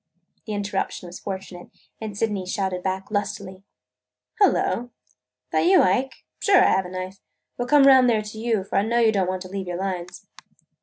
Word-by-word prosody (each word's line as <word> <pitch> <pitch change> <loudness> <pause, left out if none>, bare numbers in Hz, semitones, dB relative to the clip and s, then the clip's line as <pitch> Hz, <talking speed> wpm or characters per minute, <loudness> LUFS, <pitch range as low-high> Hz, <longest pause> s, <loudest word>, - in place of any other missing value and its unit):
The 215 - -3
interruption 200 -2 -3
was 175 0 -9
fortunate, 190 -2 -7 0.3
and 210 -2 -6
Sydney 205 -4 -1
shouted 185 -1 -2
back 190 +2 -3
lustily: 200 -2 -3 0.8
"Hullo! 245 - +2 0.6
That - - +2
you, 370 0 +6
Ike? 255 +9 0 0.2
Sure, 400 -2 +4
I - - +4
have 190 -1 +1
a - - -10
knife. 185 +1 -6 0.4
We 245 - 0
'll - - -10
come 285 +1 +6
around 260 -2 +7
there 220 -3 +2
to 215 +1 -9
you, 225 -3 0
for 195 - -3
I - - +5
know 230 +3 0
you 230 -2 +4
don't 190 -3 0
want 185 0 -3
to - - -9
leave 190 -1 -5
your 175 -1 -3
lines." 180 -2 -5
200 Hz, 195 wpm, -24 LUFS, 185-225 Hz, 0.8 s, around